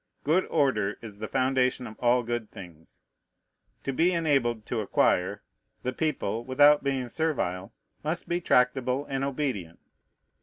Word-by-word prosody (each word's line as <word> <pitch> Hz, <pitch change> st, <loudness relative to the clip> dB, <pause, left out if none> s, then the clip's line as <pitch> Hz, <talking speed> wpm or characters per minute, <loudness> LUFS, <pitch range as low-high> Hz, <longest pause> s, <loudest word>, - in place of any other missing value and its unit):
Good 165 Hz, +6 st, +2 dB
order 110 Hz, -10 st, +1 dB
is 105 Hz, -3 st, -9 dB
the 110 Hz, -, -4 dB
foundation 130 Hz, 0 st, +1 dB
of 110 Hz, -2 st, -8 dB
all 120 Hz, 0 st, +3 dB
good 120 Hz, -2 st, -3 dB
things. 85 Hz, -, -13 dB, 0.8 s
To 135 Hz, -, -2 dB
be 170 Hz, +7 st, +3 dB
enabled 135 Hz, -9 st, +1 dB
to 120 Hz, -, -2 dB
acquire, 100 Hz, -1 st, +1 dB, 0.4 s
the 125 Hz, -, -2 dB
people, 125 Hz, -8 st, -2 dB
without 145 Hz, +3 st, +5 dB
being 135 Hz, -3 st, -1 dB
servile, 105 Hz, -, -2 dB, 0.3 s
must 160 Hz, +3 st, -2 dB
be 175 Hz, +1 st, -1 dB
tractable 125 Hz, -1 st, +2 dB
and 135 Hz, 0 st, -2 dB
obedient. 130 Hz, -, -3 dB
125 Hz, 140 wpm, -27 LUFS, 110-145 Hz, 0.8 s, without